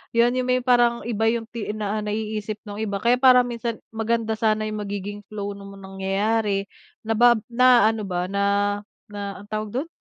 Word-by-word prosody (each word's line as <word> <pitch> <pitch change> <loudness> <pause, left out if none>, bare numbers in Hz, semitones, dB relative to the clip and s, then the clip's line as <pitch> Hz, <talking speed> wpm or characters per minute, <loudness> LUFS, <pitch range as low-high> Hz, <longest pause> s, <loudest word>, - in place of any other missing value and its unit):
Yun 235 +1 +5
yung 255 - -1
may 255 0 +1
parang 240 -2 +3
iba 225 -1 0
yung 230 0 +1
ti 230 -3 -5
naiisip 215 0 -3
nung 205 -1 -8
iba 205 -2 -2
kaya 235 +5 +2
parang 255 -1 +7
minsan 235 -1 -3 0.2
maganda 225 0 -1
sana 215 -1 +2
yung 215 0 -3
magiging 205 0 -5
flow 205 -1 -5
nung 200 0 -10
nangyayari 195 +2 -1 0.4
na 225 +1 0
ba 240 0 +7 0.2
na 250 -1 +6
ano 215 -3 -5
ba 180 0 -2
na- 200 - 0 0.7
na 200 -1 -5
ano'ng 205 - -20
tawag 215 0 -3
dun, 280 +6 -1
215 Hz, 180 wpm, -23 LUFS, 205-235 Hz, 0.7 s, parang